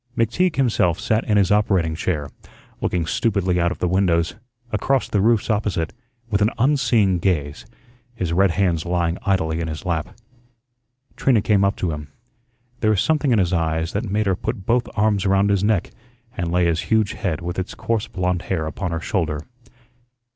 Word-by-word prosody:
McTeague 160 Hz, -, +1 dB
himself 110 Hz, -10 st, +2 dB
sat 110 Hz, +1 st, +1 dB
in 105 Hz, -, +2 dB
his 100 Hz, -1 st, +3 dB
operating 95 Hz, -6 st, +2 dB
chair, 80 Hz, -2 st, -2 dB, 0.5 s
looking 85 Hz, -2 st, 0 dB
stupidly 95 Hz, 0 st, 0 dB
out 85 Hz, +1 st, +2 dB
of -, -, -5 dB
the 90 Hz, -, -1 dB
windows, 85 Hz, -2 st, +1 dB, 0.4 s
across 130 Hz, +5 st, +1 dB
the 100 Hz, -, +1 dB
roofs 115 Hz, +1 st, +2 dB
opposite, 100 Hz, -6 st, -1 dB, 0.3 s
with 105 Hz, -2 st, 0 dB
an 105 Hz, -, +4 dB
unseeing 115 Hz, -8 st, +2 dB
gaze, 75 Hz, -6 st, -1 dB, 0.5 s
his 90 Hz, -6 st, -2 dB
red 95 Hz, +2 st, +4 dB
hands 85 Hz, -3 st, +1 dB
lying 85 Hz, -1 st, -1 dB
idly 80 Hz, -5 st, +1 dB
in 80 Hz, -, -2 dB
his 80 Hz, +3 st, -6 dB
lap. 85 Hz, +1 st, -3 dB, 1.0 s
Trina 120 Hz, -7 st, +2 dB
came 100 Hz, -2 st, +3 dB
up 100 Hz, 0 st, +2 dB
to 90 Hz, -, -2 dB
him. 75 Hz, -1 st, -6 dB, 0.7 s
There 110 Hz, -, +2 dB
was 105 Hz, -3 st, +2 dB
something 150 Hz, +1 st, +1 dB
in 115 Hz, -, +4 dB
his 90 Hz, -3 st, +1 dB
eyes 80 Hz, 0 st, 0 dB
that 105 Hz, +1 st, -2 dB
made 105 Hz, +2 st, 0 dB
her 95 Hz, -1 st, +2 dB
put 95 Hz, 0 st, -4 dB
both 120 Hz, +1 st, +1 dB
arms 105 Hz, -1 st, +1 dB
around 95 Hz, +1 st, +3 dB
his 100 Hz, -1 st, +1 dB
neck 105 Hz, -4 st, +1 dB, 0.4 s
and 85 Hz, -3 st, -2 dB
lay 90 Hz, 0 st, +2 dB
his 85 Hz, -1 st, +1 dB
huge 110 Hz, -1 st, +2 dB
head 90 Hz, -5 st, -2 dB
with 90 Hz, +1 st, -4 dB
its 95 Hz, -, -5 dB
coarse 110 Hz, -1 st, -1 dB
blond 90 Hz, -1 st, -1 dB
hair 80 Hz, -5 st, 0 dB
upon 90 Hz, +4 st, -4 dB
her 85 Hz, 0 st, -3 dB
shoulder. 80 Hz, -7 st, -2 dB
95 Hz, 185 wpm, -22 LUFS, 85-105 Hz, 1.0 s, an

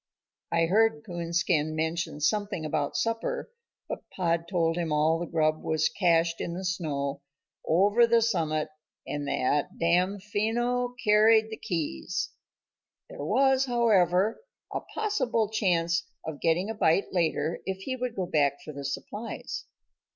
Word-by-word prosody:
I 165 Hz, 0 st, +3 dB
heard 225 Hz, +5 st, +2 dB
Coonskin 170 Hz, -3 st, 0 dB
mention 160 Hz, -1 st, -2 dB
something 205 Hz, 0 st, 0 dB
about 150 Hz, -2 st, -1 dB
supper, 230 Hz, -, -2 dB, 0.4 s
but -, -, -7 dB
Pod 170 Hz, -2 st, -1 dB
told 165 Hz, -3 st, +1 dB
him 170 Hz, -2 st, -2 dB
all 155 Hz, +2 st, +2 dB
the 175 Hz, -, -3 dB
grub 155 Hz, -1 st, +1 dB
was 160 Hz, -1 st, +1 dB
cachéd 165 Hz, -3 st, +2 dB
in 170 Hz, -, -3 dB
the 190 Hz, +1 st, -5 dB
snow 145 Hz, -6 st, -2 dB, 0.4 s
over 205 Hz, +8 st, +4 dB
the 230 Hz, 0 st, +4 dB
summit 160 Hz, -8 st, 0 dB, 0.4 s
and 145 Hz, -1 st, -4 dB
that 140 Hz, +2 st, 0 dB
Damfino 210 Hz, +8 st, 0 dB
carried 220 Hz, +1 st, +5 dB
the 220 Hz, -, -5 dB
keys; 160 Hz, -, -3 dB, 0.8 s
there -, -, -7 dB
was, 265 Hz, -, +3 dB
however, 215 Hz, -, +2 dB, 0.3 s
a -, -, 0 dB
possible 255 Hz, -, -1 dB
chance 170 Hz, -6 st, +1 dB, 0.2 s
of 160 Hz, -2 st, -6 dB
getting 170 Hz, +4 st, +2 dB
a -, -, -3 dB
bite 195 Hz, -2 st, +2 dB
later 165 Hz, -2 st, 0 dB
if 190 Hz, 0 st, -3 dB
he 260 Hz, -, -2 dB
would 250 Hz, -2 st, -4 dB
go 185 Hz, -, -1 dB
back 150 Hz, -5 st, +2 dB
for 150 Hz, -, -7 dB
the 140 Hz, 0 st, -7 dB
supplies. 210 Hz, +11 st, -5 dB
175 Hz, 140 wpm, -28 LUFS, 160-220 Hz, 0.8 s, carried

